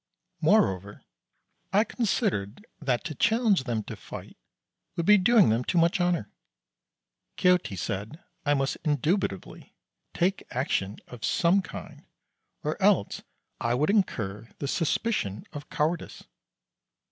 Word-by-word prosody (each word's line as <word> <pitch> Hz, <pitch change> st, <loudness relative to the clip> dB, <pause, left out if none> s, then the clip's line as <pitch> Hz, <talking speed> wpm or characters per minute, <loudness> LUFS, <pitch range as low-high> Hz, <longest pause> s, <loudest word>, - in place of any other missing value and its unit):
Moreover, 95 Hz, +2 st, +2 dB, 0.7 s
I 205 Hz, +3 st, +4 dB
considered 205 Hz, -, -1 dB
that 130 Hz, -5 st, 0 dB
to 155 Hz, -, -4 dB
challenge 220 Hz, -, +2 dB
them 115 Hz, -4 st, -1 dB
to -, -, -7 dB
fight -, -, -10 dB, 0.6 s
would 170 Hz, -, -1 dB
be 210 Hz, +1 st, +7 dB
doing 220 Hz, -, +5 dB
them 115 Hz, +3 st, +1 dB
too 175 Hz, -, -1 dB
much 170 Hz, +2 st, +3 dB
honour. 175 Hz, -, 0 dB, 1.1 s
Quixote 180 Hz, -, +3 dB
said 105 Hz, -, -4 dB, 0.2 s
I 145 Hz, -1 st, +2 dB
must 135 Hz, 0 st, 0 dB
indubitably, 150 Hz, -, -1 dB, 0.4 s
take 185 Hz, +3 st, +1 dB
action 115 Hz, -6 st, -1 dB
of 125 Hz, -2 st, -11 dB
some 180 Hz, +3 st, +3 dB
kind, 165 Hz, -, -10 dB, 0.6 s
or -, -, -3 dB
else -, -, +3 dB, 0.4 s
I 120 Hz, +1 st, 0 dB
would 150 Hz, +8 st, +2 dB
incur 110 Hz, -, -1 dB
the 140 Hz, -, -4 dB
suspicion 155 Hz, -, -1 dB
of 145 Hz, 0 st, -8 dB
cowardice. 160 Hz, +3 st, -2 dB
150 Hz, 125 wpm, -27 LUFS, 115-185 Hz, 1.1 s, be